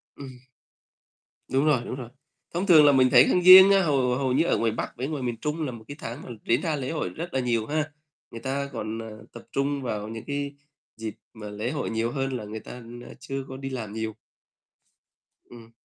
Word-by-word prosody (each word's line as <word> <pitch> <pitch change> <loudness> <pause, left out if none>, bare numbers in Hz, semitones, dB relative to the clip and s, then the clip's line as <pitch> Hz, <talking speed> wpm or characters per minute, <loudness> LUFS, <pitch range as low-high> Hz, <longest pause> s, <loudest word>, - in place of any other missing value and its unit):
Ừm. 130 -3 -10 1.1
Đúng 135 +3 +2
rồi, 145 -6 +3
đúng - - -5
rồi. 125 -3 -8 0.4
Thông 175 +3 -1
thường 160 -6 +7
là 145 - +7
mình 130 -2 +4
thấy 125 0 +8
tháng 180 - +2
Giêng 190 +2 +11
á, 195 -1 +5
hầu 135 -6 +1
hầu 130 -1 0
như 145 +5 +3
ở - - +2
ngoài 115 -1 +1
Bắc 115 - -5
với 130 +3 -3
ngoài 150 -3 -4
miền 120 -2 -2
Trung 150 +1 -2
là 130 - -3
một 115 -2 -10
cái 145 - -8
tháng 120 +5 -6
mà - - -11 0.2
diễn 120 +4 +2
ra 160 -3 -1
lễ 130 -3 -4
hội 160 - -2
rất 170 +2 -7
là 135 - +1
nhiều 120 -3 0
ha. 155 +2 -2 0.4
Người 115 - -8
ta 140 +1 -3
còn, 110 -1 -4
à, 110 - -8 0.2
tập 120 - -10
trung 140 0 -1
vào 105 -4 -3
những 110 0 -7
cái 140 0 -3 0.4
dịp 110 -1 -5 0.2
mà 105 -2 -8
lễ 105 +4 -3
hội 145 - -3
nhiều 115 +1 -1
hơn 135 0 -2
là 115 - -7
người 110 +1 -6
ta, - - -11 0.3
a, - - -11
chưa 135 0 -5
có 130 - -8
đi 135 0 -5
làm 115 -6 -5
nhiều. 110 -1 -4 1.3
Ừm. 115 -1 -14
130 Hz, 230 wpm, -26 LUFS, 115-145 Hz, 1.3 s, Giêng